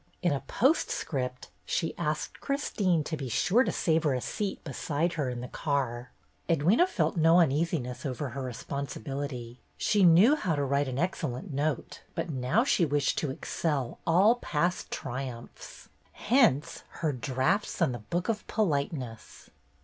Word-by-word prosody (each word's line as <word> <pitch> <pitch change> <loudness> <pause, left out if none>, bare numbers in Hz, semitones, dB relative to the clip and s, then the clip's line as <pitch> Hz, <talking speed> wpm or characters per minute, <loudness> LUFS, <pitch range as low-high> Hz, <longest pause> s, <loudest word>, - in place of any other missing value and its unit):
In 175 - +3
a 140 - 0
postscript, 135 - -1
she 165 - -1
asked 155 -2 -3
Christine 200 - 0
to 160 - -3
be 135 -4 -5
sure 215 - +3
to - - -1
save 160 -1 +1
her 145 -4 +2
a - - 0
seat 200 - -3
beside 155 +4 -1
her 145 -5 -1
in 125 -1 -4
the 125 - -5
car. 130 -5 -2 0.4
Edwyna 165 +6 +3
had 360 +2 +5
felt 165 - 0
no 165 +2 +6
uneasiness 150 -5 0
over 140 +1 -3
her 135 +3 -5
re 130 -1 -4
sponsibility. 135 -1 -5 0.2
She 205 -2 +2
knew 185 - +7
how 180 - -1
to 145 - 0
write 140 +1 +1
an 130 -1 -3
ex 175 +6 -1
cellent 155 +4 -4
note, 145 +2 -2
but 170 - -2
now 135 - +1
she 230 -9 +2
wished 145 -3 +1
to 150 - -2
excel 135 -1 -2
all 195 +8 +5
past 175 -3 -1
triumphs. 125 -2 -7 0.2
Hence 230 - +2 0.2
her 155 - +3
draughts 135 - 0
on 165 -7 +3
"The 120 - -5
Book 170 - -3
of 225 -2 -2
Politeness." 140 - -2
150 Hz, 165 wpm, -29 LUFS, 130-175 Hz, 0.4 s, knew